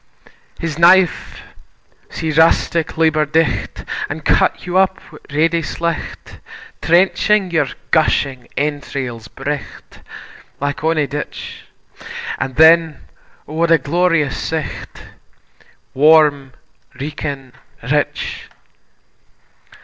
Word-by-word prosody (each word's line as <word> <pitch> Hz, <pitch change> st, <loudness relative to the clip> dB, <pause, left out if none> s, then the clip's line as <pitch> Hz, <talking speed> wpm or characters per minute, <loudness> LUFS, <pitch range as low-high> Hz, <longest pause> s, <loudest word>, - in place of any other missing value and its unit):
His 165 Hz, -1 st, -4 dB
knife 180 Hz, +1 st, +3 dB, 0.7 s
see 160 Hz, -1 st, -3 dB
rustic 160 Hz, +1 st, +2 dB
labour 160 Hz, -1 st, +3 dB
dight, 160 Hz, +1 st, -1 dB, 0.2 s
An' -, -, -5 dB
cut -, -, +1 dB
you 180 Hz, 0 st, -4 dB
up 190 Hz, 0 st, +2 dB
wi' 150 Hz, -, -13 dB
ready 165 Hz, +3 st, +1 dB
slight, 170 Hz, +1 st, -5 dB, 0.4 s
Trenching 190 Hz, +3 st, +2 dB
your 160 Hz, -, +1 dB, 0.2 s
gushing 140 Hz, -5 st, +1 dB
entrails 140 Hz, -5 st, -3 dB
bright 145 Hz, +2 st, -7 dB, 0.6 s
Like 145 Hz, +1 st, -2 dB
onie 160 Hz, -2 st, +1 dB
ditch; 145 Hz, +1 st, -7 dB, 0.7 s
And 130 Hz, 0 st, -3 dB
then, 160 Hz, -1 st, +5 dB, 0.5 s
O 150 Hz, -, -9 dB
what 165 Hz, +1 st, +1 dB
a 165 Hz, -, +6 dB
glorious 160 Hz, 0 st, +1 dB
sight, 160 Hz, -3 st, -5 dB, 0.9 s
Warm 145 Hz, -2 st, +4 dB, 0.5 s
reekin, 140 Hz, -2 st, -5 dB, 0.4 s
rich! 460 Hz, -, -1 dB
155 Hz, 95 wpm, -17 LUFS, 145-170 Hz, 0.9 s, a